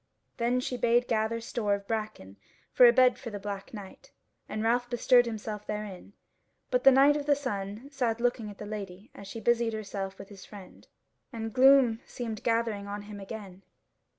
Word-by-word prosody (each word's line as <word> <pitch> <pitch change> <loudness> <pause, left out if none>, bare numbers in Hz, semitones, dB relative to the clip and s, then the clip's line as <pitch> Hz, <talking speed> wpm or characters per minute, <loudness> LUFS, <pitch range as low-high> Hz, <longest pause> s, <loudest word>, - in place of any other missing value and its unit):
Then 240 +2 +1
she 250 0 -3
bade 240 +1 +2
gather 225 0 0
store 225 -3 -1
of 200 0 -9
bracken 215 - -5 0.3
for 250 - +7
a - - +8
bed 250 0 +4
for 240 - -7
the 205 - -6
Black 200 -1 -6
Knight, 200 -4 -11 0.4
and 215 - -3
Ralph 245 +2 +1
bestirred 245 0 +4
himself 215 -2 -6
therein, 210 -2 -6 0.6
but - - +1
the 270 - +9
Knight 275 +2 +6
of 295 -1 -3
the 290 - +5
Sun 215 -2 -5
sat 240 -5 -1
looking 240 -2 -1
at 205 - -11
the 210 - -7
Lady 200 -1 -7
as 200 - -11
she 225 - -7
busied 235 0 +1
herself 195 -2 -5
with 195 - -11
his 195 -3 -12
friend, 200 -3 -13 0.4
and 225 -3 -5
gloom 260 -3 +6
seemed 225 -3 -5
gathering 225 -3 0
on 205 0 -5
him 205 0 -9
again. 195 -2 -9
225 Hz, 185 wpm, -29 LUFS, 205-245 Hz, 0.6 s, the